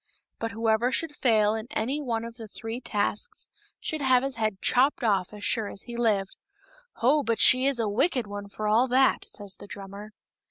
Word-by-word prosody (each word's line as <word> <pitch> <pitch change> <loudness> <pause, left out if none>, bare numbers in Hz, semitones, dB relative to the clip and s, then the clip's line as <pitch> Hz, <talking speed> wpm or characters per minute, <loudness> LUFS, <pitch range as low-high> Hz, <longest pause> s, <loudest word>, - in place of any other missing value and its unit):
But 230 - -2
whoever 225 +2 +1
should 295 +2 -1
fail 215 -6 +3
in 220 +1 -4
any 265 +7 -2
one 230 -4 -2
of 230 0 -9
the 225 -2 -8
three 225 +3 -6
tasks 205 -3 -2 0.3
should 310 -1 -3
have 260 -2 +4
his 270 -3 -3
head 215 -4 -1
chopped 265 +7 +3
ofif 200 -6 +1
as 210 -1 -10
sure 220 -3 0
as 200 - -8
he 240 - -8
lived. 210 -5 0 0.3
(" - - -30
Ho! 290 +5 +5
but 230 -4 0
she 255 +1 +6
is 275 -2 +3
a 225 -2 +1
wicked 240 - +1
one 205 0 -7
for 215 +1 -4
all 225 +5 +4
that," 260 +1 +3
says 200 -2 -7
the - - -12
drummer.) 200 +2 -9
230 Hz, 205 wpm, -27 LUFS, 210-255 Hz, 0.3 s, she